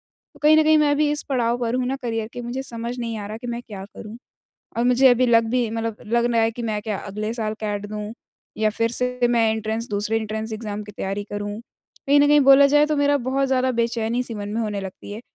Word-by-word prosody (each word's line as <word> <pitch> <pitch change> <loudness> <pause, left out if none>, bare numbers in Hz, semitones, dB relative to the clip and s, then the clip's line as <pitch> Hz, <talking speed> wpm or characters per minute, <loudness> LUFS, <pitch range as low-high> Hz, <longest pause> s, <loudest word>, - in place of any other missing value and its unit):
तो - - -25
कहीं 310 +1 +6
न 315 - +5
कहीं 310 0 +5
मैं 290 -1 +3
भी 300 0 +2
इस 295 - -2
पड़ाव 240 -3 +1
पर 235 0 -1
हूँ 255 0 0
ना 270 - -1
करियर 225 -2 -2
के 245 - -6
मुझे 245 +3 -4
समझ 235 0 -5
नहीं 230 -1 -3
आ 205 - -6
रहा 215 +1 -6
कि 245 - -9
मैं 240 0 -4
क्या 195 -4 -8
करूँ 215 +1 -9 0.6
और 235 - +1
मुझे 250 +2 +5
अभी 250 +1 +4
लग 230 -1 +4
भी 245 -2 +1
मतलब 225 -1 -3
लग 235 +2 +2
ना 230 - +1
है 225 0 +3
कि 235 +1 -7
मैं 215 -2 -2
क्या 210 -2 -3
अगले 210 +2 -4
साल 220 -2 -2
कैट 205 -1 -3
दूँ? 210 +1 -6 0.5
या 215 0 +2
फिर 230 +2 -1
से 250 0 0
मैं 230 -2 +3
एंट्रेंस 220 +2 -3
दूसरे 205 +2 0
एंट्रेंस 220 +1 -4
एग्ज़ाम 210 -1 -5
की 210 - -11
तैयारी 200 0 -4
करूँ? 205 +1 -4 0.5
कहीं 285 +1 +5
न 290 - +5
कहीं 295 0 +6
बोला 275 +1 +7
जाए 295 +1 +4
तो 305 -1 0
मेरा 285 0 +3
बहुत 270 +1 +1
ज़्यादा 260 0 +2
बेचैनी-सी 235 0 -1
मन 205 -1 -5
में 215 +3 -2
होने 210 -3 -2
लगती 195 +1 -8
है। 215 - -7
230 Hz, 250 wpm, -22 LUFS, 215-250 Hz, 0.6 s, बोला